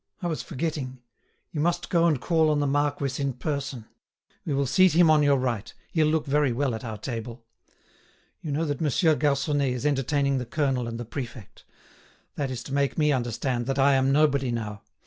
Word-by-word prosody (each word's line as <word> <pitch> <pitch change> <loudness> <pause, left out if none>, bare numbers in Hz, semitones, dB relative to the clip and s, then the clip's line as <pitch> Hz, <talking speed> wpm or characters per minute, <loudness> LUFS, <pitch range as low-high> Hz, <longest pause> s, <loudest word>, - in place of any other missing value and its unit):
I - - -6
was 165 -3 -2
forgetting; 135 -3 -4 0.5
you 150 - -2
must 170 +2 -1
go 170 -1 +4
and 155 -6 +2
call 160 +2 +2
on 150 -1 +2
the 145 - +1
marquis 145 -1 0
in 140 -1 0
person; 135 -2 -4 0.6
we 150 - -1
will 140 0 +1
seat 185 +7 +4
him 165 -1 +6
on 155 -1 +5
your 145 -1 +4
right; 120 -4 -2 0.2
he'll 160 -4 +2
look 155 0 +1
very 145 -1 +2
well 130 +1 0
at 110 - -5
our 110 -3 -5
table. 115 +1 -6 1.0
You 155 - -5
know 155 +3 0
that 145 -2 -3
Monsieur 160 +2 +3
Garconnet 145 -1 +1
is 125 +2 -4
entertaining 140 -1 +1
the 125 - -4
colonel 135 -3 0
and 115 0 -5
the 120 - -5
prefect. 120 -3 -8 0.7
That 140 -2 -2
is 125 -2 -5
to 135 - -7
make 140 -1 0
me 150 -2 +3
understand 120 -1 -1
that 135 0 -1
I 140 +1 +5
am 135 0 +3
nobody 140 -2 +3
now. 105 -3 -4
140 Hz, 200 wpm, -26 LUFS, 125-150 Hz, 1.0 s, him